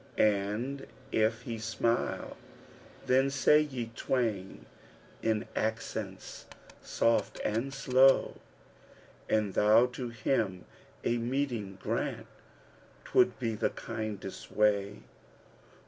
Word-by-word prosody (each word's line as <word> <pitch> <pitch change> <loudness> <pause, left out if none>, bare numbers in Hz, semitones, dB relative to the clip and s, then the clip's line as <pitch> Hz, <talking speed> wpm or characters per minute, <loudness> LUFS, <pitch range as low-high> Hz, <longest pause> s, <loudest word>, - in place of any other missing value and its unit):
* - - -25
And 105 +7 0 0.2
if 110 +2 +1
he 115 -2 -5
smile 110 +2 -1 0.7
then 130 +2 +3
say 140 +2 +5
ye 130 -6 -4
twain 105 - -2 0.6
in 110 -1 0
accents 110 -3 -4 0.3
soft 115 - +1
and 115 +6 -1
slow, 135 0 +4 0.9
'An 105 -2 +2
thou 105 +5 +5
to 125 0 -5
him 110 -5 -1 0.4
a 120 0 +1
meeting 120 -6 -2
grant - - -2 0.8
'twould 125 -2 +3
be 115 -3 -2
the 110 +1 0
kindest 105 -3 -6
way! 105 - +1
115 Hz, 100 wpm, -30 LUFS, 105-125 Hz, 0.9 s, say